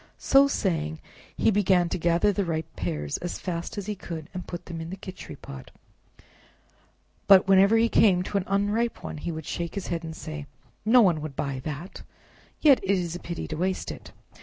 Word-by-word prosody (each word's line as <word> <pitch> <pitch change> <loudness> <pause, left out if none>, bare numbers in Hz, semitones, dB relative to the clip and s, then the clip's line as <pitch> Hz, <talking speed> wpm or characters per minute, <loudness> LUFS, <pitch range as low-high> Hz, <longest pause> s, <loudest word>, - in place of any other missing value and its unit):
So 275 0 +5
saying, 160 - -1 0.4
he - - +3
began 190 -3 +3
to - - -2
gather 170 +5 +3
the 200 - 0
ripe 160 -2 -3
pears 75 -5 -3
as 175 - -4
fast 170 +1 -5
as 200 - -3
he 210 - -2
could 165 -5 -7
and 180 -1 -6
put 175 - -7
them 165 -2 -6
in 160 - -6
the 190 - -6
Khichri 185 -1 -9
pot, 65 -1 -10 1.6
but 195 -1 +7
whenever 195 +3 +6
he 230 +1 +4
came 190 -5 +4
to 200 - -2
an - - -3
unripe 205 +4 0
one - - -5
he 170 - -4
would 160 -2 -6
shake 170 +3 -4
his 200 - -4
head 170 -1 -2
and 160 -1 -6
say, 155 -3 -7 0.4
"No 240 +3 +7
one 175 -7 +3
would 150 -3 -6
buy 135 -2 -3
that, 155 +4 -6 0.6
yet 285 -4 +6
it 195 - -7
is 175 -4 +1
a - - -5
pity 170 -1 -5
to 155 - -4
waste 185 +2 -1
it." - - -10
180 Hz, 205 wpm, -26 LUFS, 160-200 Hz, 1.6 s, but